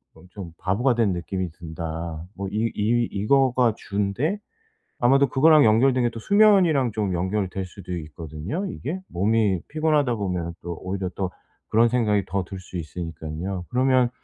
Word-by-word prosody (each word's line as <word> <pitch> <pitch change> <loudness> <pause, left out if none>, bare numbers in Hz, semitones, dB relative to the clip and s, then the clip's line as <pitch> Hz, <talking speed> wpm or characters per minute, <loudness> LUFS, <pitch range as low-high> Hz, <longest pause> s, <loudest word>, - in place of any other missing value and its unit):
엄청 90 -1 -10
바보가 120 +7 +1
된 110 -5 +2
느낌이 90 0 -3
든다. 80 0 -6
뭐 100 0 -4
이 110 +2 -1
이 115 +3 +1
이거가 125 +2 +3
주인데 105 - -1 0.6
아마도 135 +3 +4
그거랑 150 +1 +6
연결된 125 +3 +4
게 - - +2
또 115 - -7
수면이랑 185 - +4
좀 105 -4 -1
연결될 95 +1 -2
수도 90 -1 -7
있거든요, 80 - -5
이게? 175 +1 -4
몸이 100 0 +1
피곤하다 150 -4 +1
보면은 90 -5 -3
또 85 -1 -5
오히려 95 0 -3
또 95 -2 -2 0.4
그런 115 +2 +4
생각이 105 -5 +1
더 95 0 -1
들 95 +1 -8
수 90 0 -8
있으니깐요. 85 +2 -5
그러면 130 -1 +3
105 Hz, 325 characters per minute, -24 LUFS, 90-125 Hz, 0.6 s, 그거랑